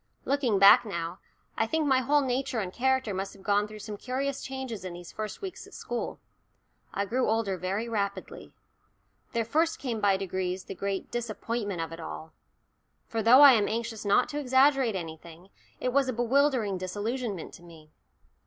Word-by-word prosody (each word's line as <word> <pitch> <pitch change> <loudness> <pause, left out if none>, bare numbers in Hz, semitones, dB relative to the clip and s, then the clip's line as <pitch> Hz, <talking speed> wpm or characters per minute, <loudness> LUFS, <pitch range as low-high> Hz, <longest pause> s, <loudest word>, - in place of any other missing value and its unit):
Looking 265 -7 +1
back 195 +1 +8
now, 170 -4 -5 0.4
I 225 - +1
think 320 +4 0
my 265 -2 +4
whole 285 +3 +3
nature 260 -1 -1
and 190 -3 -4
character 260 -4 +1
must 195 +1 -4
have 195 - -16
gone 205 0 +2
through 215 0 -10
some 210 -1 -6
curious 265 +4 -3
changes 260 -7 -5
in 185 -2 -6
these 175 0 -10
first 215 - -6
weeks 380 -2 -7
at - - -14
school. 240 -1 -4 0.7
I 200 - -1
grew 245 +4 0
older 220 -3 0
very 190 +6 -3
rapidly. 200 -3 -4 0.8
There 230 -1 0
first 320 +8 +1
came 235 -5 -3
by 200 -1 +3
degrees 185 -1 -3
the - - -7
great 195 0 -4
disappointment 225 -4 -3
of 165 0 -4
it 165 - -8
all 160 0 -8 0.7
for 225 - -2
though 240 +5 +7
I 285 -1 +11
am 210 -4 +2
anxious 230 0 -3
not 205 +4 +3
to 295 - -3
exaggerate 265 -3 +3
anything, 170 +1 -8 0.3
it 250 - -1
was 275 -1 +3
a - - 0
bewildering 240 -4 +1
"disillusionment" 205 +1 -4
to - - -13
me. 160 -3 -15
220 Hz, 180 wpm, -28 LUFS, 195-255 Hz, 0.8 s, I